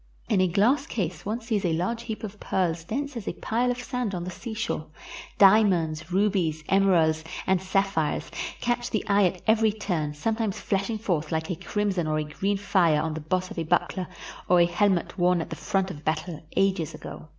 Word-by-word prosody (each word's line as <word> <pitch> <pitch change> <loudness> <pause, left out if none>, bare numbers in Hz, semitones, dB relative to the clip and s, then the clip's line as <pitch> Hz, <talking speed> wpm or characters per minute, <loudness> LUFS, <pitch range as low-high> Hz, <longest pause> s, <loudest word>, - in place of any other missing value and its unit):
In 190 - +3
a 185 - +4
glass 215 - +2
case 180 -5 -3
one 225 +3 -2
sees 220 -3 -1
a 170 -3 +1
large 190 +8 -1
heap 225 -2 -6
of 210 -1 -7
pearls 170 -3 -1
dense 280 - -3
as 230 - -6
a - - -1
pile 240 +3 0
of 245 - 0
sand 245 -5 -3
on 175 - -3
the 180 - -5
seashore. 220 -6 -4 0.5
Diamonds, 185 -6 +4
rubies, 185 -5 +1
emeralds, 170 -5 +3 0.2
and 190 -1 +2
sapphires 190 -4 0 0.3
catch 240 0 0
the 215 - -2
eye 200 -1 +4
at 180 0 -5
every 220 0 +4
turn, 170 -8 -2
sometimes 220 +5 -1
flash 195 +1 -1
ing 225 - -1
forth 175 -8 -1
like 160 +1 -1
a - - -1
crimson 195 -2 -1
or 155 0 0
a 155 - 0
green 195 +7 -1
fire 180 -6 +3
on 160 +1 -1
the 160 - -5
boss 185 +4 -1
of - - -5
a - - 0
buckler 175 +2 0 0.4
or 180 0 +6
a 170 - +6
helmet 180 +1 +1
worn 180 0 +4
at 165 - -5
the - - -3
front 190 -1 -1
of 150 -3 -10
battle 155 +1 -2 0.2
ages 190 -5 +1
ago. - - -9
190 Hz, 205 wpm, -26 LUFS, 165-210 Hz, 0.5 s, or